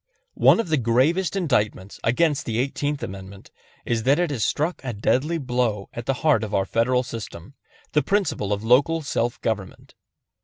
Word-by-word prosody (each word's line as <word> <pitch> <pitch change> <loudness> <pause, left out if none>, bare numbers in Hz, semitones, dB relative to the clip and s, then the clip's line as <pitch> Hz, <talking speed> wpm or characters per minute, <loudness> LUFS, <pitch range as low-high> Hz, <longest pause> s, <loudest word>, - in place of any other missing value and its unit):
One - - +6
of 230 - -2
the 155 - +2
gravest 140 - +1
indictments 105 - -1
against 150 +5 +1
the 115 -1 -1
Eighteenth 140 +3 -2
Amendment 95 0 -9 0.3
is 115 -1 0
that 135 +5 +3
it 175 -3 0
has 120 -6 -1
struck 160 +5 -1
a 125 -3 -3
deadly 130 +10 0
blow 125 -7 -1
at 120 0 -7
the 135 - +1
heart 140 -8 +4
of 105 -1 -3
our 95 - +1
Federal 125 +5 +1
system, 115 -3 -8 0.4
the 150 - +3
principle 195 - -1
of 105 +1 -1
local 140 +8 +3
self 120 -4 -1
government. 105 -5 -4
125 Hz, 170 wpm, -23 LUFS, 110-150 Hz, 0.4 s, One